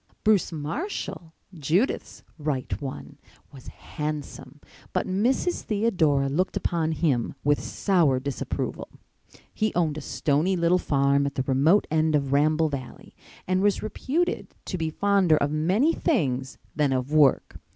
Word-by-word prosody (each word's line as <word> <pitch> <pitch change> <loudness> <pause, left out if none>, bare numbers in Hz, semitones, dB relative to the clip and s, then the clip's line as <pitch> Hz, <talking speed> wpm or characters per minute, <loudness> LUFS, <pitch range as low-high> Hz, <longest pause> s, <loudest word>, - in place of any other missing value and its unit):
Bruce 210 -5 +3
Marshall, 170 - -5 0.2
Judith's 170 - -1 0.2
"right 145 -3 -3
one" 135 -2 -7 0.3
was 130 -3 -13
handsome, 150 -2 -6 0.3
but - - 0
Mrs. 245 - 0
Theodora 175 -11 +1
looked 170 +8 0
upon 160 -2 -1
him 140 -7 0
with 145 0 +2
sour 165 -10 +1
disapproval. 135 0 -4 0.6
He 215 -1 0
owned 155 -3 0
a - - -8
stony 155 +6 0
little 175 +1 +2
farm 140 -1 +2
at 140 - -6
the 130 - 0
remote 140 +10 +3
end 155 0 +2
of 140 -2 0
Ramble 155 +2 +3
Valley 135 -3 -8 0.3
and 185 0 +1
was 205 0 +1
reputed 295 +10 -2
to - - -4
be 160 -1 -1
fonder 195 -2 +3
of 145 0 0
many 190 - +2
things 135 - -1 0.2
than 145 -3 +2
of 130 +3 -2
work. 150 -3 +3
155 Hz, 140 wpm, -25 LUFS, 140-190 Hz, 0.6 s, Bruce